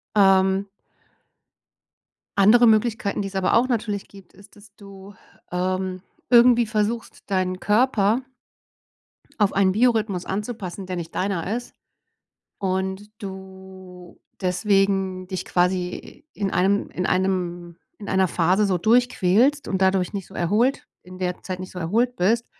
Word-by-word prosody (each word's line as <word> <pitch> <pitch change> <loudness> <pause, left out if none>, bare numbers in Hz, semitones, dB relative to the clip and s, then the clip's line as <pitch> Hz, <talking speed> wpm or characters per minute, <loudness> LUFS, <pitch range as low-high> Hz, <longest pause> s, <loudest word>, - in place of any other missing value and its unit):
Ähm 195 0 +4 1.7
andere 235 +5 +6
Möglichkeiten, 215 -2 +1
die 195 - -4
es 195 - -14
aber 190 -1 +1
auch 240 +2 +4
natürlich 215 -5 -2
gibt, 195 -3 -17
ist, 200 +1 -18
dass 205 0 -18
du 200 -1 -13 0.4
ähm, 185 +1 -2 0.3
irgendwie 240 -1 +6
versuchst, 215 +2 -2
deinen 185 -1 0
Körper 220 +1 +2 1.2
auf 205 -2 +2
einen 195 -1 +3
Biorhythmus 215 -4 +1
anzupassen, 200 -2 -5
der 185 - -4
nicht 170 -2 -6
deiner 195 +1 -2
ist 245 0 -7 0.8
und 190 +1 -3
du 190 -2 -11 0.2
deswegen 190 0 0
dich 185 -1 -4
quasi 180 +9 -2
in 200 -2 -3
einem 200 +2 +1
in 180 - -3
einem 180 -2 -1 0.2
in 205 - -10
einer 190 -1 +2
Phase 185 +6 +2
so 190 -2 +1
durchquälst 245 - +2
und 190 -1 -2
dadurch 190 -1 +2
nicht 195 -3 -5
so - - -17
erholt 215 +10 0 0.2
in 185 +1 -12
der 180 -1 -3
Zeit 185 -1 -5
nicht 185 0 -8
so 180 - -7
erholt 230 +9 0
bist 225 +7 +1
195 Hz, 135 wpm, -23 LUFS, 185-215 Hz, 1.7 s, andere